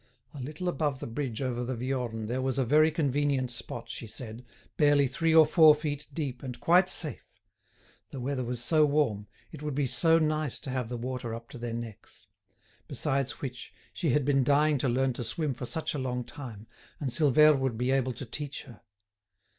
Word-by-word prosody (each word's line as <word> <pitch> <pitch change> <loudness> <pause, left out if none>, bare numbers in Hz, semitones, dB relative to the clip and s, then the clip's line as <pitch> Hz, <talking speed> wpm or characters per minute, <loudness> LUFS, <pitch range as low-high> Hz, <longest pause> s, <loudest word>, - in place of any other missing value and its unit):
A 140 - -7
little 150 +7 -5
above 150 -6 -1
the - - -5
bridge 120 0 -3
over 125 -2 -2
the 125 +1 -3
Viorne 120 -3 -3
there 125 +4 -2
was 130 0 -1
a 135 - +2
very 155 +5 +5
convenient 145 -4 0
spot, 120 0 -6
she 115 0 -6
said, 115 +2 -9 0.3
barely 145 -2 +4
three 160 +5 +1
or 160 -1 +9
four 155 -1 +7
feet 150 -1 -4
deep 140 -6 -4
and 125 -3 -7
quite 180 +5 +4
safe; 155 -5 -2 0.9
the 135 - -7
weather 130 +1 -2
was 120 0 -4
so 155 +3 +4
warm, 140 -9 +1 0.2
it - - -10
would 150 -3 -3
be 145 0 +1
so 165 +5 +3
nice 155 -3 0
to 135 - -5
have 125 -3 -2
the 120 - -3
water 120 -1 -4
up 115 0 -10
to - - -10
their 115 -1 -4
necks; 115 -2 -9 0.6
besides 135 -1 -2
which, 130 -2 -7 0.2
she 170 - -1
had 135 +1 +2
been 135 -2 +3
dying 145 +2 +3
to 130 - +1
learn 130 +2 +1
to 120 - -4
swim 145 +5 -2
for 125 +1 -6
such 160 +3 -1
a 145 - -3
long 125 -1 -2
time, 115 -6 -9 0.3
and 135 -4 -2
Silvère 150 +1 +5
would 130 -4 -1
be 125 +2 0
able 130 -1 +1
to 130 +4 -7
teach 145 +4 -5
her. 120 -6 -14
135 Hz, 200 wpm, -29 LUFS, 120-150 Hz, 0.9 s, or